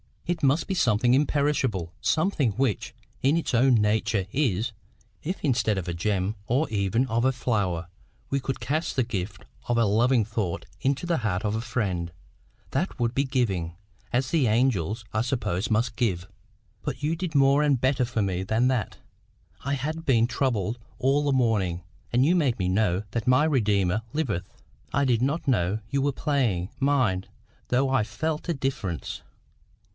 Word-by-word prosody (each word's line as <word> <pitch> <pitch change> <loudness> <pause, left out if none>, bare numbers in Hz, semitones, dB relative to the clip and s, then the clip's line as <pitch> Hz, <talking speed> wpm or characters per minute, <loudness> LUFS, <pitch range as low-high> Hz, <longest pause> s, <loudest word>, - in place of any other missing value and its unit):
"It 175 -1 -2
must 140 +3 +3
be 195 - -2
something 120 - +3
imperishable,—something 140 - +1
which 125 -2 -1 0.3
in 140 +5 +3
its 170 - -2
own 125 +2 +5
nature 105 -2 +1
IS. 120 -5 0 0.5
If 180 +5 -4
instead 120 -7 +2
of 90 -2 -3
a - - -2
gem, 95 +3 -1
or 135 +7 +2
even 105 +4 +1
of 115 0 0
a 130 +1 +3
flower, 100 -9 -1 0.4
we 140 - +2
could 135 0 -3
cast 155 +4 -1
the 130 - +2
gift 100 -4 -5 0.2
of 120 - +1
a 115 - +4
lovely 115 +4 +3
thought 105 -5 -3
into 140 +5 0
the 170 -1 +1
heart 105 -4 -1
of 105 -1 0
a 110 - -1
friend, 95 -8 -2 0.6
that 160 +8 -1
would 120 0 +1
be 140 +2 +1
giving, 100 -11 -1 0.4
as 130 +2 +1
the 155 -7 +3
angels, 110 -2 +1
I 110 - +1
suppose, 115 -6 -1
must 115 +1 0
give. 95 -6 0 0.5
But - - -5
you 155 +3 +1
did 170 -3 -4
more 140 +1 +5
and 145 -4 +3
better 130 0 +2
for 115 -2 -1
me 95 -2 -1
than 110 +6 +2
that. 125 -6 -1 0.7
I 140 - 0
had 155 +4 -3
been 115 -4 +4
troubled 120 -4 -1 0.2
all 140 +3 +2
the 140 - +2
morning; 105 -9 +1 0.3
and 125 +3 +3
you 170 +4 +4
made 140 -9 +2
me 90 -2 0
know 95 -1 +1
that 115 +1 -3
my 130 +4 +5
Redeemer 105 - +2
liveth. 120 - -2 0.4
I 140 - +2
did 120 -3 +2
not 145 +5 0
know 105 -5 +1
you 140 -1 0
were 140 0 +1
playing, 120 - 0
mind, 130 -10 +1 0.4
though 130 +2 +2
I 130 -4 +2
felt 155 +8 -3
a - - +3
difference. 120 - -3
120 Hz, 170 wpm, -26 LUFS, 105-140 Hz, 0.7 s, own